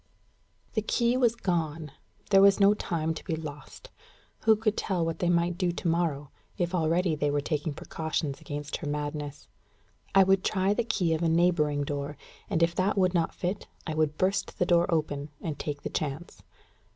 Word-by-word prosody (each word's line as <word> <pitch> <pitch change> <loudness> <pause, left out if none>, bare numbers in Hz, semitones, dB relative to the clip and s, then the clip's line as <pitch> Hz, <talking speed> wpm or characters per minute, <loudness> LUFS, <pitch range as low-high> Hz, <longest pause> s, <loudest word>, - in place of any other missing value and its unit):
The 215 - +1
key 235 +3 +1
was 240 -3 +3
gone. 165 -7 -2 0.4
There 195 -1 +7
was 200 0 +6
no 200 +1 +6
time 160 -5 -2
to 160 - -8
be 160 - -2
lost. 150 -2 -9 0.5
Who 220 0 +7
could 215 -1 0
tell 180 -4 -1
what 165 0 -3
they 175 - +1
might 175 0 +1
do 180 -2 +2
to 175 - -4
morrow, 160 -4 0 0.3
if 175 0 -1
already 170 0 +2
they 145 -1 0
were 145 0 +1
taking 150 +1 -2
precautions 155 -1 -3
against 145 0 -5
her 155 - -6
madness? 145 0 -4 0.7
I 195 - +8
would 190 0 +3
try 190 0 +1
the 235 - 0
key 180 -7 0
of 160 - -1
a 165 - +2
neighbouring 160 -4 +2
door, 145 +1 -4 0.3
and 170 -5 +2
if 170 0 +2
that 190 +4 0
would 185 -1 +3
not 170 -2 0
fit, 185 +3 -3 0.2
I 155 - -3
would 155 -1 0
burst 190 +2 0
the 180 - +2
door 175 0 +3
open, 150 -2 -1
and 155 -3 -5
take 145 -1 -4
the - - -3
chance. 155 +3 -4
165 Hz, 190 wpm, -28 LUFS, 150-185 Hz, 0.7 s, I